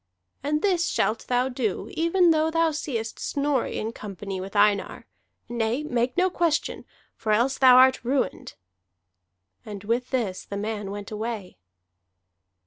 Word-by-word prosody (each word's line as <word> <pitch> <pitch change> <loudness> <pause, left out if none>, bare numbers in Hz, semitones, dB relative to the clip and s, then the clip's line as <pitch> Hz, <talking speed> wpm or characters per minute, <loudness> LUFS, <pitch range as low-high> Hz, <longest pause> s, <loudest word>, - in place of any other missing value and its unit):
"And 300 +2 -1
this 360 -4 +2
shalt 220 +1 0
thou 250 +1 +2
do 245 -6 -2
even 335 +2 +3
though 315 0 +2
thou 330 0 +2
seest 240 -7 -4
Snorri 285 -2 -1
in 220 - -3
company 195 -3 -6
with 195 +2 -8
Einar. 205 -1 +2 0.4
Nay, 240 +3 -1
make 250 -2 -1
no 365 +1 +4
question, 340 -3 -1 0.3
for 215 - -2
else 240 +5 +2
thou 255 -2 +8
art 260 -1 +5
ruined." 260 +2 -2 1.1
And 205 -2 -8
with 235 +4 -1
this 225 -8 -2
the 200 - -6
man 210 -1 -3
went 205 +1 -7
away. 215 - -5
240 Hz, 140 wpm, -25 LUFS, 210-295 Hz, 1.1 s, thou